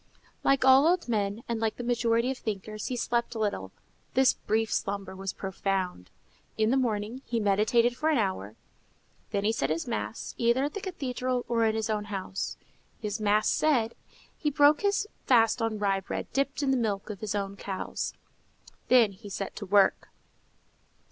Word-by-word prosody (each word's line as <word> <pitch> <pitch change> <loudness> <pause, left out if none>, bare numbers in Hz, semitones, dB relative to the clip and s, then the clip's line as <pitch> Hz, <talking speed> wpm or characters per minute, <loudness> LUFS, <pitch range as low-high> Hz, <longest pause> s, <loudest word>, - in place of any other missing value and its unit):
Like 275 -1 +3
all 265 +3 +7
old 350 -2 +2
men, 210 -1 -1
and 235 -1 -2
like 220 -1 0
the 245 - -6
majority 235 0 +1
of 265 - -5
thinkers, 215 0 -4
he 255 - -2
slept 235 0 -1
little. 205 - -2 0.4
This 265 0 +5
brief 220 +1 -1
slumber 195 -1 -2
was 195 0 -4
profound. 190 - -3 0.5
In 220 +1 +2
the - - +3
morning 230 -1 -1
he 235 - 0
meditated 220 +4 +3
for 310 +4 0
an 310 - +3
hour, 185 - -2 0.7
then 200 - -1
he 215 - +3
said 225 - -1
his 160 +1 -1
mass, 105 +1 -4
either 235 +3 +3
at 290 +1 -2
the 405 - -5
cathedral 255 -8 -2
or 230 -1 +2
in 220 0 +2
his 220 0 -1
own 210 -1 -1
house. 195 -2 -4 0.4
His 210 0 -3
mass 210 0 +3
said, 245 -7 +2 0.4
he 300 - -1
broke 290 +1 +5
his 405 0 +1 0.2
fast 230 -1 +4
on 225 -1 0
rye 200 -2 +1
bread 195 - -5
dipped 275 +1 0
in 270 - +2
the 265 - +3
milk 215 -3 -1
of 200 - -8
his 210 -1 -3
own 200 -1 -2
cows. 195 -1 -4 0.7
Then 240 -5 +5
he 205 +2 -11
set 195 0 -5
to 205 - -6
work. 200 0 +4
220 Hz, 180 wpm, -28 LUFS, 200-250 Hz, 0.7 s, all